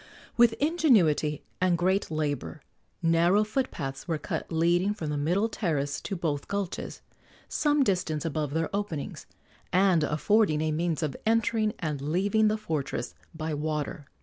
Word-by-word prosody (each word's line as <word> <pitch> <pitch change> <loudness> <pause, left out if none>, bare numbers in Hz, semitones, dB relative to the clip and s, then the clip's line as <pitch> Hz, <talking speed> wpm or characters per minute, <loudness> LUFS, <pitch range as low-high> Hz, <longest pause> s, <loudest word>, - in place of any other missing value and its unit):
With 235 -1 +5
ingenuity 220 - +2 0.2
and 180 -2 +3
great 190 +3 +1
labor 145 - -3 0.4
narrow 170 +5 +4
foot 255 +5 -1
paths 135 -1 -6
were 165 -2 0
cut - - -5
leading 175 +5 +2
from 155 -7 -4
the - - -1
middle 175 +9 +1
terrace 150 -10 -2
to 195 - -4
both 155 -5 -2
gulches, 200 -3 -4 0.5
some 295 -1 +2
distance 180 - 0
above 155 -2 -2
their 165 +4 -1
openings, 200 -8 -4 0.4
and 185 -3 +4
affording 155 +3 +2
a 155 0 0
means 165 0 -1
of 150 -4 -2
entering 220 -1 +1
and 150 -4 -3
leaving 195 +9 +2
the 215 +1 +1
fortress 155 - -3 0.2
by 160 0 -3
water. 150 +1 -3
170 Hz, 150 wpm, -28 LUFS, 150-205 Hz, 0.5 s, With